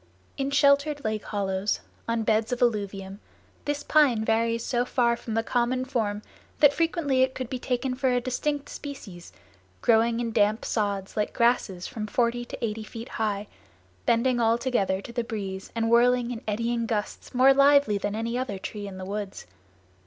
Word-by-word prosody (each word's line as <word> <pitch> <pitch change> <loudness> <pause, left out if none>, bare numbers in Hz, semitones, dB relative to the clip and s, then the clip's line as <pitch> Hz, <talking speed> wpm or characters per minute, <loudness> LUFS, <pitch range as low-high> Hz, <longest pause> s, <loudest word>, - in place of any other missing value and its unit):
In 275 0 -1
sheltered 285 +1 +3
lake 215 -1 -2
hollows, 195 -1 -1 0.3
on 230 -1 0
beds 220 +1 +1
of 250 - -1
alluvium, 200 -4 -1 0.5
this 290 0 -2
pine 260 -8 +3
varies 230 +1 +1
so 245 -1 +1
far 240 -1 +2
from 230 -1 -6
the 225 - +1
common 250 +2 0
form 215 -5 -2 0.4
that 290 -1 +7
frequently 320 -5 +1
it 260 0 +2
could 255 -2 -5
be 255 - -2
taken 255 +1 -1
for 260 +1 0
a 245 - +2
distinct 280 +4 -2
species, 210 -12 -9 0.5
growing 230 0 +3
in 235 -1 -2
damp 215 0 +2
sods 200 -3 -2
like 210 - -1
grasses 235 -6 +1
from 215 -2 -5
forty 240 +1 0
to 240 - -4
eighty 220 0 -4
feet 230 +2 -8
high, 210 -2 -2 0.6
bending 240 +1 +3
all 230 0 +3
together 200 -6 0
to 235 - -9
the 240 -1 -1
breeze 195 -4 -5
and 225 0 0
whirling 245 +1 +4
in 235 -2 -5
eddying 230 +2 -1
gusts 215 +2 -4
more 260 +2 +7
lively 280 -6 +5
than 205 +1 -2
any 230 +2 -2
other 250 -6 -2
tree 205 +2 -6
in 190 -1 -8
the 185 - -6
woods. 200 0 -5
230 Hz, 175 wpm, -26 LUFS, 210-255 Hz, 0.6 s, that